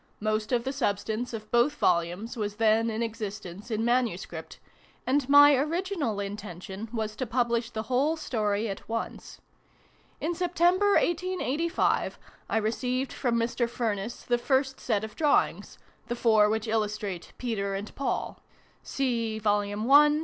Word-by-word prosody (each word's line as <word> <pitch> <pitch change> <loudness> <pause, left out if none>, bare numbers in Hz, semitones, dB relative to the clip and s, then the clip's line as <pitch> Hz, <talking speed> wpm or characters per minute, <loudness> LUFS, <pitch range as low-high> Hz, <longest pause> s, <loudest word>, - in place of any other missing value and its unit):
Most 215 +1 -1
of 240 -2 +2
the 265 +2 -2
substance 220 -1 -1
of 215 -2 -7
both 245 +5 +3
Volumes 175 +2 0
was 210 -3 -3
then 225 +1 +3
in 225 +1 -1
existence 210 -3 -6
in 225 0 -1
manuscript: 245 0 -1 0.5
and 275 0 +1
my 290 +1 +9
original 305 - -1
intention 200 0 -6
was 220 -2 -3
to 255 +2 -3
publish 235 -1 0
the 220 -2 -4
whole 270 +7 +1
story 215 -7 -1
at 195 +1 -7
once. 230 0 -5 0.8
In 330 +3 -1
September, 360 +3 +2
1885, 340 -3 +1 0.3
I - - +1
received 250 +4 -1
from 245 -3 0
Mr. 235 +1 0
Furniss 225 -2 -3
the 240 -1 +1
first 265 +1 +1
set 215 -4 0
of 220 -1 -7
drawings 300 -2 +1 0.3
the 240 - -2
four 220 -3 +4
which 220 +1 -1
illustrate 210 -4 -2
"Peter 200 -5 -2
and 200 +2 -6
Paul" 275 - -3 0.4
(see 235 -5 -1
I. - - -4
pp. 220 +9 +4
230 Hz, 140 wpm, -28 LUFS, 215-265 Hz, 0.8 s, my